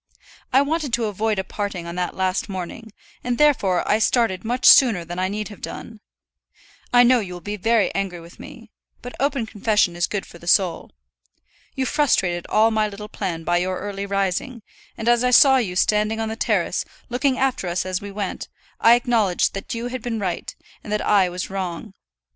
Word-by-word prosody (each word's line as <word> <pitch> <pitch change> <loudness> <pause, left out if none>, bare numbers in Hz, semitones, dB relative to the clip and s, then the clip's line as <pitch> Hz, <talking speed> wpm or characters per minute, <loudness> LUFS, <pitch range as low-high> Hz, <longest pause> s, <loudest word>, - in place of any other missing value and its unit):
I 270 +2 +5
wanted 300 -3 -2
to 235 -1 +1
avoid 215 +1 -1
a 190 - -1
parting 195 -3 -5
on 170 - -6
that 180 0 -3
last 190 +2 -1
morning, 190 +4 -7 0.3
and 245 -1 -1
therefore 230 -12 +2
I 210 - +2
started 220 -5 +1
much 245 +3 -2
sooner 220 -10 +7
than 175 +2 -6
I 185 - +1
need 210 +2 -4
have 205 - -12
done. 225 -2 -8 0.9
I 245 0 +6
know 245 0 +5
you 190 -5 -6
will 175 - -7
be 205 +5 -5
very 225 +2 +1
angry 195 -3 -3
with 170 +1 -15
me; 230 -2 -12 0.3
but 245 - -7
open 275 -3 0
confession 210 -4 +1
is 175 - 0
good 205 -2 -4
for 170 - -14
the 170 - -14
soul. 180 -2 +2 0.9
You 265 -1 -1
frustrated 190 - +1
all 220 +1 +3
my 215 -1 +1
little 210 +1 -9
plan 170 -5 -4
by 175 +1 +1
your 185 +1 -1
early 200 0 -5
rising; 200 +5 -2 0.3
and 225 - -5
as 240 0 +4
I 250 - +3
saw 265 +2 +7
you 200 -8 -2
standing 210 +3 +1
on 220 0 -2
the 220 - -4
terrace, - - 0 0.3
looking 255 +2 0
after 260 -8 0
us 175 +2 -1
as 185 -1 -3
we 205 - -7
went, 200 -1 -5 0.3
I 230 +1 +7
acknowledged 230 -7 +1
that 195 +4 -5
you 235 +1 -4
had 255 0 -5
been 240 -2 -3
right, 185 -4 -4 0.3
and 210 - -8
that 210 - -1
I 195 -3 +3
was 180 +2 -5
wrong. 190 +1 -5
210 Hz, 200 wpm, -22 LUFS, 185-235 Hz, 0.9 s, sooner